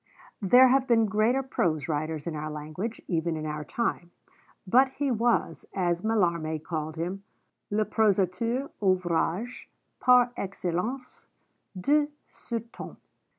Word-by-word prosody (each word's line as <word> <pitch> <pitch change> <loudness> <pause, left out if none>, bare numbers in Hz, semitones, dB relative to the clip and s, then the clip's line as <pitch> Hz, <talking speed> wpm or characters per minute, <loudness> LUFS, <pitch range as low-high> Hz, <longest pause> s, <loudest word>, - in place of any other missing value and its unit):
There 250 +6 +7
have 265 0 +3
been 225 -2 +4
greater 220 +6 +2
prose 165 - -1
writers 155 -1 -2
in 165 -2 -3
our 155 0 -4
language, 155 +9 -5
even 165 -1 -1
in 155 - -5
our 150 0 -4
time; 175 -1 -2 0.6
but 255 +8 +5
he 280 -1 -1
was, 235 +1 +1
as 175 -2 0
Mallarmé 170 -8 0
called 155 -2 -4
him, 180 +4 -4 0.5
'le 215 +1 +1
prosateur 220 +5 +1
ouvragé 185 +4 0 0.3
par 250 -1 +5
excellence 195 +7 -4 0.5
de 290 +9 +3 0.2
ce 235 - -5 0.2
temps.' - - -9
190 Hz, 125 wpm, -27 LUFS, 165-240 Hz, 0.6 s, There